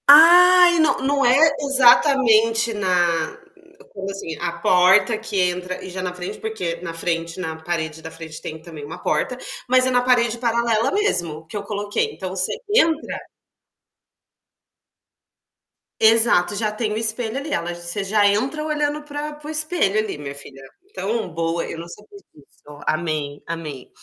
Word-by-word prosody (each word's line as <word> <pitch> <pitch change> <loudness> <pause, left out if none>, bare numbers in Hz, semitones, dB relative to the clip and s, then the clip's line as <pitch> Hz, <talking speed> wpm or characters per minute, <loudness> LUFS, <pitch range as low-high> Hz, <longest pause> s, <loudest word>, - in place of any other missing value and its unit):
Ah, 355 +4 +8
e - - +1
não 315 - +3
não 275 0 0
é 245 +1 +5 0.2
e - - -3
exatamente 240 -4 +4
na 175 -5 0 0.6
como, 195 -1 -6
assim, 195 -5 -6
a 170 - -3
porta 190 +5 +4
que 220 -2 -5
entra 180 0 -2
e - - -8
já 185 +1 -6
na 180 -1 -4
frente 180 0 -7
porque 185 -7 -4
na 170 -2 -6
frente 165 +1 -3
na 160 -3 -4
parede 160 -1 -4
da 160 - -8
frente 160 -1 -9
tem 155 0 -8
também 160 -3 -10
uma 160 - -8
porta, 200 +11 -1 0.3
mas 255 +1 +4
é 260 - +1
na 250 0 +3
parede 240 -2 +2
paralela 235 -1 0
mesmo 175 - -1
que 205 - -6
eu 200 - -5
coloquei. 205 0 -3
Então 185 - -6
você 185 0 -1 0.2
entra 325 -8 +1 2.8
Exato, 220 -4 +4
já 215 0 -1
tem 215 0 -3
o - - -3
espelho 225 +2 0
ali. 285 +2 -5
Ela 170 -5 -2
você 175 +3 -4
já 205 +1 +2
entra 260 +10 -1
olhando 300 -1 -2
para 295 0 -6
para 295 0 -12
o - - -6
espelho 310 - +1
ali, 215 -7 -3
minha 140 -1 -7
filha. 140 -1 -9 0.3
Então, 230 - -3
boa, 165 0 -2
eu - - -7
não 170 - -8
sabia 210 - -14 0.2
disso. 145 0 -17
Amei, 155 -3 -2
amei. 155 -6 -7
205 Hz, 165 wpm, -21 LUFS, 170-250 Hz, 2.8 s, Ah